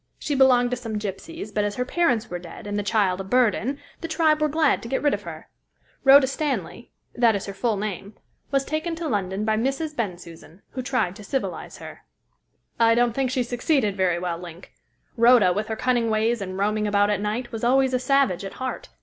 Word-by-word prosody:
She 295 - -3
belonged 255 -3 +4
to 250 - -1
some 225 -3 -5
gypsies, 210 - -6
but 210 - +1
as 205 0 -2
her 250 - -1
parents 255 -7 +1
were 175 - -5
dead, 175 +5 -11
and 205 0 -4
the 205 - 0
child 195 -2 +1
a - - -5
burden, 245 +4 +1 0.2
the 330 - -5
tribe 315 -1 +2
were 305 - +2
glad 310 -1 +2
to 230 - -8
get 265 - -1
rid 290 - +3
of - - -2
her. - - -9 0.6
Rhoda 275 0 +8
Stanley 260 - -3 0.2
that 235 -3 +3
is 200 - -3
her 200 - -6
full 220 +1 -1
name 205 0 -5 0.3
was 275 -1 +1
taken 315 +2 -2
to 330 0 -4
London 200 -3 -2
by 215 0 +1
Mrs. 275 +6 -2
Bensusan, 175 - -7
who 255 - -4
tried 250 -8 -1
to 210 - -11
civilise 265 +6 -4
her." - - -10 0.8
"I 230 0 +5
don't 240 -1 +2
think 265 +1 0
she 255 -1 0
succeeded 245 -3 0
very 185 -3 +1
well, 175 -1 -3
Link. 175 0 -11 0.4
Rhoda, 230 -6 +6
with 210 +3 -2
her 220 - -3
cunning 240 -1 +1
ways 220 +1 +1
and 185 -1 -5
roaming 210 +1 0
about 205 0 +2
at 205 -1 -1
night, 225 +4 -3
was 225 -1 -6
always 260 +2 +3
a 255 - +2
savage 260 -8 +2
at 195 - -6
heart. 260 0 -5
230 Hz, 215 wpm, -24 LUFS, 200-265 Hz, 0.8 s, Rhoda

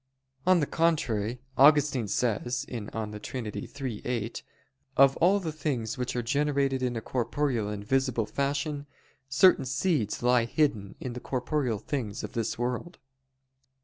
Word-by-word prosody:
On 185 -2 +5
the - - +2
contrary, 125 -9 0 0.2
Augustine 140 -4 +5
says 120 +4 0
(De 110 -3 -5
Trin. 120 +3 -5
iii, 130 -6 -5
8): 115 -2 -3 0.5
"Of 135 0 +6
all 190 +4 +4
the 165 -5 -3
things 135 -8 -2
which 125 -2 -3
are 120 - -1
generated 140 0 +1
in 125 -1 -1
a 115 - -3
corporeal 125 -2 -1
and 105 -1 -5
visible 130 -2 +1
fashion, 140 +3 -2 0.4
certain 140 +4 +5
seeds 130 - 0
lie 125 -1 +4
hidden 115 -7 0
in 125 - -5
the 125 - -5
corporeal 125 -2 -1
things 110 -3 -4
of 105 - -6
this 115 -2 -2
world." 125 +8 -3
125 Hz, 145 wpm, -28 LUFS, 115-145 Hz, 0.5 s, Of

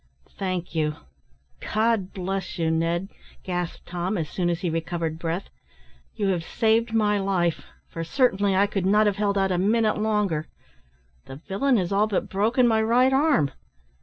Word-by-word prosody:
"Thank 185 -3 -4
you 155 -2 0 0.6
God 215 -3 0
bless 190 0 -4
you, 165 -1 +1
Ned," 170 +3 0 0.3
gasped 180 -2 -4
Tom, 180 +4 -2
as 160 -3 -3
soon 175 -2 0
as 170 0 -2
he 180 - -1
recovered 165 -1 -3
breath; 170 +3 -3 0.6
"you 200 -2 0
have 175 -3 0
saved 225 +5 +1
my 210 -2 +2
life, 185 -4 0 0.2
for 165 - -5
certainly 200 -1 +2
I 195 +2 +4
could 195 -2 -2
not 210 +2 +4
have 205 -1 +1
held 200 -1 0
out 195 -1 +1
a 180 - +1
minute 215 +2 +2
longer. 210 -8 0 0.8
The 135 - -9
villain 200 - 0
has 180 -2 -1
all 205 +2 +3
but 205 - -2
broken 230 +6 +2
my 220 -1 +3
right 245 +4 +3
arm." 270 - +3
195 Hz, 165 wpm, -25 LUFS, 175-215 Hz, 0.8 s, I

